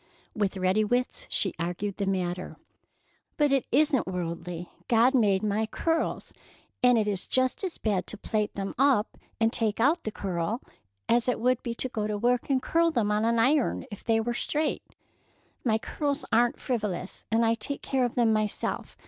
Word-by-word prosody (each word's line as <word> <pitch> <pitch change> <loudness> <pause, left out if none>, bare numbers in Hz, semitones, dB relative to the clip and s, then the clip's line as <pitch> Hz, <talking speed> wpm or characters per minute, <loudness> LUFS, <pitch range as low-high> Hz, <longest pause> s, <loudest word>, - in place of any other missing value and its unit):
With 205 -2 0
ready 190 +3 +2
wits 245 +4 -1
she 190 - 0
argued 180 +4 -3
the 200 - -1
matter: 180 -1 -2 0.8
"But 295 -2 +3
it 275 -2 +2
isn't 285 -4 +3
worldly. 175 -1 -4 0.2
God 235 +3 +4
made 205 -6 +3
my 215 +1 0
curls, 325 +8 -1 0.5
and 250 -2 +5
it 215 -2 +1
is 200 -3 -2
just 255 +7 +1
as 370 -3 -3
bad 200 -4 -1
to 215 - -5
plait 210 0 -2
them 195 0 -3
up 265 -6 +3 0.2
and 225 0 +2
take 220 -2 0
out 300 +8 +3
the 215 - -3
curl 195 +4 -3 0.4
as 235 +1 +2
it 250 - +1
would 250 +1 +2
be 235 -1 -4
to 260 - -1
go 215 -4 -3
to 210 -1 -2
work 245 +4 +1
and 265 -2 +1
curl 335 0 +3
them 225 -9 0
on 210 +1 +1
an 230 0 +2
iron 260 +4 +2
if 205 - -9
they 225 -1 +2
were 240 +2 -1
straight. 300 +5 -1 0.8
My 220 -3 +2
curls 285 +5 -2
are 235 +2 +5
n't - - -15
frivolous, 210 -7 -3
and 230 +1 +3
I 225 - +3
take 230 +5 -4
care 265 -2 0
of 245 - -1
them 230 -2 +3
myself. 215 -1 -2
225 Hz, 190 wpm, -27 LUFS, 205-255 Hz, 0.8 s, and